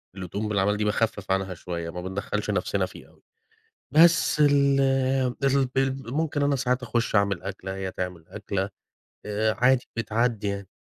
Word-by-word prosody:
اللي 95 -1 -6
تقوم 105 +4 -3
بالأعمال 105 0 +1
دي، 105 - -1
باخفِّف 105 -2 -1
عنها 95 -1 0
شوية 85 -1 -5
ما 90 +1 -6
بندخّلش 100 +3 -3
نَفْسنا 100 0 0
فيها 90 - -13
أوي، - - -25 0.7
بس 165 0 +5
ال 140 -1 +4 0.6
ال 135 -1 +3
ال 135 -2 -1
ممكن 150 -1 0
أنا 140 0 +2
ساعات 125 -1 0
أخُش 115 -1 -1
أعمل 100 -3 +2
أكلة، 95 0 -5
هي 95 -1 -4
تعمل 90 -3 -5
أكلة، 100 -1 -3 0.6
آآ 110 +1 0
عادي 125 0 +3
بتعدّي 115 -1 0
يعني. 100 -1 -3
105 Hz, 160 wpm, -26 LUFS, 95-130 Hz, 0.7 s, بس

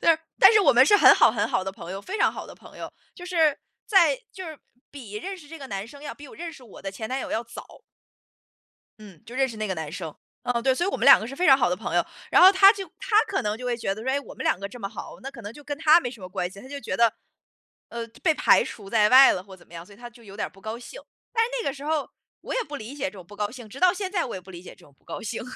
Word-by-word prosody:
对， 330 -1 +4 0.2
但 - - +8
是 430 - +5
我 390 - +5
们 250 +1 +6
是 415 - +6
很 - - +8
好 - - +5
很 - - 0
好 - - 0
的 190 - -3
朋 170 -2 -10
友， 195 +1 -5
非 385 - -6
常 - - +3
好 - - -8
的 - - -12
朋 - - -16
友。 - - -8 0.2
就 355 - -10
是 325 -5 +2 0.3
在 385 +3 +4 0.2
就 375 - -8
是 315 -2 -9 0.3
比 245 -8 -11
认 380 - -5
识 300 -5 -15
这 325 +1 -10
个 275 - -9
男 200 -2 -5
生 285 +4 -14
要 300 - -7
比 290 - -13
我 - - -13
认 335 0 -6
识 265 - -15
我 225 - -14
的 195 - -4
前 220 +3 -7
男 260 +1 -2
友 - - -6
要 225 - -1
早。 230 - -12 1.2
嗯， 200 -5 -14
就 235 +3 -10
认 265 0 +2
识 230 -4 -9
那 215 -1 -3
个 190 - -2
男 160 -4 -6
生， 165 -3 -6 0.3
嗯， 245 -1 -1
对， 265 +1 +2
所 345 - -1
以 - - 0
我 - - -3
们 - - -1
两 275 - +9
个 220 - -6
是 270 - -8
非 360 +5 +1
常 270 -2 +8
好 245 - +2
的 180 - 0
朋 210 - -5
友。 - - +2 0.2
然 - - +5
后 370 +1 +10
他 390 0 +7
就 395 -3 -6
他 425 - -2
可 - - -1
能 210 +1 -2
就 250 - -8
会 245 -1 0
觉 210 -4 -2
得 215 - -9
说， 265 - -1
诶， 280 - 0
我 280 - -12
们 - - -6
两 - - +1
个 200 - -5
这 245 - -12
么 195 - -4
好， 215 - -9
那 270 - -6
可 235 - -12
能 205 -1 -7
就 295 - -14
跟 290 0 -5
他 320 +2 +6
没 245 - -4
什 235 - -13
么 185 - -7
关 180 -1 -3
系。 195 - -13
他 260 - -12
就 285 +1 -7
觉 235 - -4
得， 230 -2 +3 0.8
呃， 235 0 -5 0.2
被 315 - +4
排 - - +4
除 200 -3 -9
在 210 -2 +3
外 265 +2 +8
了 180 - -5
或 195 - -14
者 - - -22
怎 - - -21
么 - - -19
样， 170 0 -9
所 200 - -16
以 - - -19
他 240 +1 -10
就 235 0 -19
有 200 -2 -12
点 - - -3
儿 - - -14
不 195 +1 -20
高 220 +1 -5
兴。 250 - -11 0.3
但 455 -1 +3
是 475 - -6
那 - - -2
个 - - -4
时 280 +1 -10
候， 305 -2 -1 0.3
我 - - -6
也 - - 0
不 300 - -8
理 235 +1 -8
解 290 - -3
这 190 - -3
种 185 -4 -13
不 205 - -14
高 205 0 -2
兴， 240 -2 -11
直 260 - -11
到 365 -1 +4
现 385 -1 -5
在 365 -4 0
我 240 - -6
也 185 - -7
不 190 +1 -14
理 175 -1 -10
解 - - -11
这 - - -17
种 140 - -22
不 - - -37
高 - - -7
兴。 225 +1 -5
245 Hz, 360 characters per minute, -25 LUFS, 205-305 Hz, 1.2 s, 后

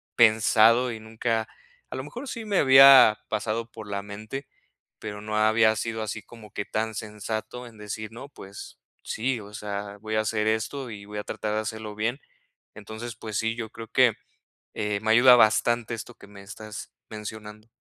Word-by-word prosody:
pensado 115 +2 +5
y 110 - -6
nunca, 110 0 -2 0.4
a - - -6
lo - - -4
mejor 250 +4 -8
sí 230 -3 -6
me 205 -3 +1
había 135 -5 +8
pasado 110 +2 -2
por 110 -2 -10
la 100 0 -4
mente, 110 +7 -7 0.5
pero 105 -1 -7
no 105 0 -4
había 110 +1 +4
sido 110 +1 -3
así 110 0 -5
como 105 0 -15
que 100 - -3
tan 110 0 -2
sensato 110 +3 -5
en 115 - -15
decir: 110 +1 -6
"No, 130 +5 -10
pues 100 -7 -11 0.2
sí, 120 +2 -2
o 105 0 -12
sea, 100 -1 -5
voy 110 +1 -6
a 110 - +3
hacer 110 0 -1
esto, 115 +4 -1
y 100 -2 -9
voy 105 0 -8
a 105 - -4
tratar 105 -1 -4
de 110 - 0
hacerlo 110 -1 -6
bien". 115 +5 -1 0.6
Entonces, 110 +3 -8
pues 110 -2 -6
sí, 110 0 0
yo 115 -2 -5
creo 115 -1 -10
que, 125 0 +4 0.6
eh, 105 -1 -2
me 110 +1 -1
ayuda 125 +2 +8
bastante 120 +1 +3
esto 120 +2 -8
que - - -16
me 100 -1 -13
estás 105 +2 -9 0.2
mencionando. 105 0 -8
110 Hz, 185 wpm, -26 LUFS, 105-115 Hz, 0.6 s, había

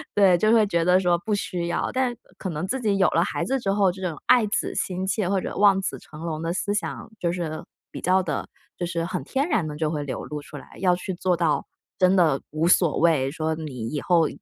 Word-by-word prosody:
对， 190 -4 +5
就 215 +4 +3
会 220 -3 +5
觉 170 -3 +1
得 180 +1 +5
说 175 -2 +2
不 210 +3 -2
需 175 -3 -3
要。 170 - -1
但 255 -1 +1 0.2
可 190 - -4
能 165 +3 -3
自 265 +3 -2
己 205 -3 +1
有 190 - +4
了 170 - +3
孩 - - -2
子 270 +1 0
之 195 - 0
后， 200 -2 +3
这 190 - -11
种 165 -4 -4
爱 245 -3 +6
子 205 - -2
心 185 0 -2
切 190 -1 0
或 195 -1 +2
者 - - -5
望 200 -2 +5
子 - - -3
成 150 - -13
龙 160 -2 -3
的 165 +1 -2
思 205 +2 -1
想 210 - -4
就 170 -1 0
是 165 -3 -4 0.3
比 - - -7
较 185 +1 +3
地 165 - -3 0.3
就 175 - -2
是 170 -1 -2
很 185 - -3
天 275 +4 -1
然 195 - +1
地 150 - -5
就 155 -1 0
会 150 -2 -2
流 140 - -5
露 150 -1 -5
出 145 0 -10
来。 - - -12
要 180 -2 +4
去 190 +1 -4
做 180 0 0
到 165 -3 +1 0.3
真 185 +1 +4
的 155 -6 +3
无 155 +2 0
所 175 -3 +4
谓， 150 -5 +3
说 160 0 -2
你 130 -8 -6
以 145 -2 -3
后 170 -4 +3
180 Hz, 270 characters per minute, -24 LUFS, 160-195 Hz, 0.3 s, 爱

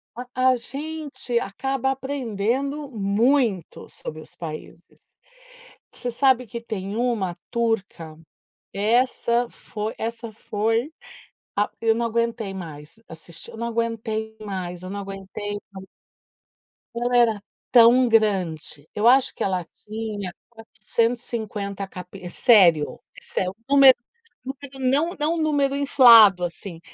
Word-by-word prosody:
A 245 +1 -7 0.2
a 255 - +1
gente 280 -1 -4
acaba 265 +6 -2
aprendendo 270 +1 -2
muito 215 - 0
sobre 155 0 -8
os - - -13
países. 165 +1 -10 0.9
Você 245 - -4
sabe 255 0 +3
que 235 +3 -6
tem 210 -3 -5
uma 230 -8 0 0.2
turca, 200 -9 -2 0.5
essa 235 +2 +1
foi 215 +1 -6
essa 230 0 -4
foi 225 +7 -1 0.7
ah, 205 - +2
eu 225 -1 +4
não 235 +1 -1
aguentei 230 -3 -1
mais 165 +2 -9
assistir, 165 +1 -7
eu - - -11
não 235 +1 -3
aguentei 225 -1 -3
mais, 185 -4 -5
eu 185 - -6
não 200 +1 -5
aguentei 195 +1 -6 1.4
ela 245 +1 +1
era 225 -4 +3 0.3
tão 245 +1 +7
grande, 185 -9 0
eu 210 +3 +2
acho 260 +1 +5
que - - -4
ela 185 -3 -1 0.2
tinha 210 -3 -5 0.2
450 225 -3 -3
capi 180 0 -9
sério, 175 -12 +4 0.2
isso - - -4
é 185 - 0
o 190 - -10
número 275 -2 +8 0.8
número - - -9
não, 280 +7 +1
não 310 +3 0
número 285 -3 +1
inflado 230 -9 +7
assim, 170 0 -5
225 Hz, 120 wpm, -23 LUFS, 195-245 Hz, 1.4 s, número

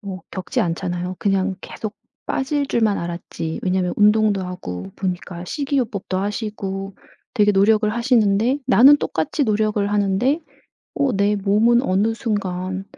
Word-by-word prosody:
뭐 190 -4 -7
겪지 185 - -3
않잖아요. 175 +1 -2
그냥 195 -1 0
계속 215 -1 -7 0.3
빠질 280 +1 -1
줄만 220 -5 +1
알았지. 170 -1 -5
왜냐면 185 -1 0
운동도 210 -1 +3
하고 95 - -6
보니까 180 -2 -4
식이요법도 240 - -2
하시고 195 -1 -4 0.4
되게 210 -3 +4
노력을 210 +2 +3
하시는데 235 +1 +2
나는 265 +3 +7
똑같이 220 - -1
노력을 215 -2 +1
하는데 205 - +1 0.5
어 275 -3 +1
내 205 +1 +2
몸은 215 +5 +3
어느 200 +3 +1
순간 190 -4 -3
205 Hz, 300 characters per minute, -21 LUFS, 185-225 Hz, 0.5 s, 나는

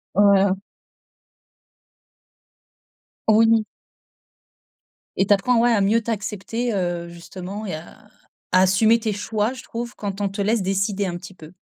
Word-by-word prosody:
Voilà. 200 -1 +5 2.7
Oui. 225 0 +5 1.5
Et 195 - +3
tu 205 - +6
apprends, 230 +4 +2
ouais 240 0 +4
à 220 - +3
mieux 220 +4 +3
t'accepter, 220 +1 -3
heu, 175 -2 -2
justement 185 +4 -8
et 180 - -3
à 160 +2 -11 0.5
à 185 - +5
assumer 215 +5 +4
tes 220 -2 -1
choix, 210 +2 -1
je 260 - -10
trouve 235 +1 -6
quand 200 -1 -4
on 200 - 0
te 200 +1 -4
laisse 215 +1 +1
décider 195 +1 0
un 175 -1 -3
petit 190 +1 -11
peu. 160 0 -14
200 Hz, 140 wpm, -22 LUFS, 190-225 Hz, 2.7 s, tu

